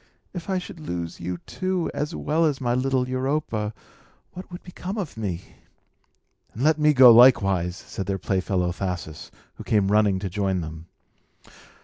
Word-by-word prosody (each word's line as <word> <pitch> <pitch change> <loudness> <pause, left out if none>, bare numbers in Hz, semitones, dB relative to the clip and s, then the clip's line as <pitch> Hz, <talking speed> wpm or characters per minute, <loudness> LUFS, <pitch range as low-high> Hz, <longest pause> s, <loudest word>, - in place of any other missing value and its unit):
If 175 0 -7
I 190 - +1
should 180 -2 -7
lose 85 - -5
you, 90 +1 -4
too, 185 -2 -2
as 150 +3 -3
well 160 +3 0
as 150 -4 +1
my 120 -2 0
little 130 0 0
Europa, 130 -5 -2 0.6
what 185 +1 -10
would 175 - -9
become 185 +3 -6
of 190 -8 -4
me?" 95 -6 -4 1.1
"And 120 - -3
let 155 +1 +3
me 150 0 +5
go 130 -4 +8
likewise!" 95 -8 +5
said 95 +1 -7
their 100 -1 -1
playfellow 95 -1 -1
Thasus, 90 -4 -5 0.3
who - - -8
came 100 -3 +1
running 105 -2 +3
to 95 +1 -4
join 95 -1 -1
them. 80 +1 -8
110 Hz, 160 wpm, -24 LUFS, 95-150 Hz, 1.1 s, go